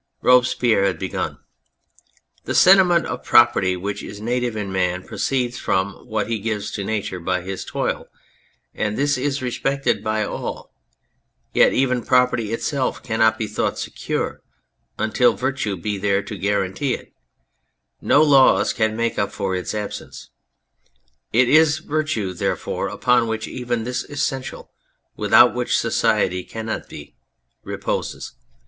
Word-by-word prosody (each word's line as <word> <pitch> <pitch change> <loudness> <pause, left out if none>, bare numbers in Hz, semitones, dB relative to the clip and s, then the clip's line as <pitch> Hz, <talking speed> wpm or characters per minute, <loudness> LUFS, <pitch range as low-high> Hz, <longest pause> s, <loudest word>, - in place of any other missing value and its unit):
Robespierre 125 -4 +4
had 95 - 0
begun: 95 - -4 0.5
" - - -36
The - - -2
sentiment 180 -2 +6
of - - -5
property 95 -1 +4
which 100 +3 -4
is 100 - -9
native 120 +1 -1
in 105 -2 -4
man 90 -1 -1
proceeds 125 -2 -2
from 95 +2 0 0.2
what 110 -2 -2
he 115 -1 -2
gives 105 -1 -3
to 100 - -4
Nature 100 -3 -3
by 90 +1 -1
his 95 +1 -5
toil, - - -3 0.7
and 105 0 -2
this 145 +1 +2
is 135 +1 -2
respected 135 +2 -1
by 110 0 0
all, - - -6 0.8
yet - - +5
even 125 -2 +1
property 125 -4 +2
itself 130 +3 -2
cannot 110 0 +2
be 110 - -2
thought 105 0 -2
secure - - -4 0.6
until 110 +3 +2
Virtue 130 -7 -2
be 100 +3 -3
there 100 0 +1
to 105 - -7
guarantee 100 +6 -1
it, - - -14 0.9
no 150 - +4
laws 135 -7 +5
can 110 -2 0
make 115 0 -1
up 100 - 0
for 95 -1 -3
its 90 +3 -4
absence. 105 -1 -7 1.0
It 125 +2 +4
is 155 +2 +5
Virtue, 155 - -2
therefore, 85 - -2
upon 125 -2 +2
which 110 0 -3
even 120 -2 -3
this 125 +2 -3
essential, 135 -2 -4 0.4
without - - +5
which - - 0
society 90 0 +1
cannot 110 +2 -5
be, 75 - -11 0.5
reposes. - - -4
110 Hz, 140 wpm, -21 LUFS, 100-125 Hz, 1.0 s, sentiment